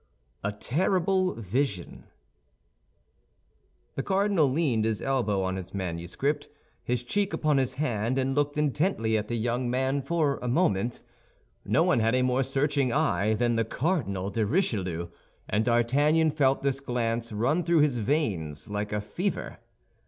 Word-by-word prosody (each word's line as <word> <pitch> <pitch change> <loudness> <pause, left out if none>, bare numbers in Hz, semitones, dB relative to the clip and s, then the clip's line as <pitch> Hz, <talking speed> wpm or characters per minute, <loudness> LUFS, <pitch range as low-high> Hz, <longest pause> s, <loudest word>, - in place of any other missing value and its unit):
A 100 - 0
TERRIBLE 185 - +1
VISION 110 -3 -3 1.9
The - - -2
cardinal 195 -4 +2
leaned 130 -6 +1
his 110 -1 0
elbow 115 -8 0
on 95 0 -2
his 95 +1 -8
manuscript, 95 - -2 0.3
his 125 0 -1
cheek 200 +10 -1
upon 150 -2 +1
his 130 -2 0
hand, 125 -3 -1
and 135 0 +1
looked 145 +1 0
intently 145 - +1
at 105 -1 -1
the 120 - -2
young 120 +2 -1
man 130 +3 0
for 145 -1 0
a 125 - -3
moment. 120 - 0 0.6
No - - +2
one - - +3
had 115 +2 +2
a 130 - +2
more 130 +1 +2
searching 135 0 0
eye 110 - +1
than 120 +1 +1
the 115 - +3
Cardinal 110 - -1
de 110 +2 0
Richelieu, 95 - -1 0.4
and 105 +1 +1
D'Artagnan 145 +7 +3
felt 135 -3 +2
this 135 -1 0
glance 115 -3 -2
run 130 +11 +1
through 170 -1 +3
his 145 -4 +2
veins 105 - -2
like 105 0 -3
a 105 0 -1
fever. 180 - -3
125 Hz, 150 wpm, -27 LUFS, 110-150 Hz, 1.9 s, one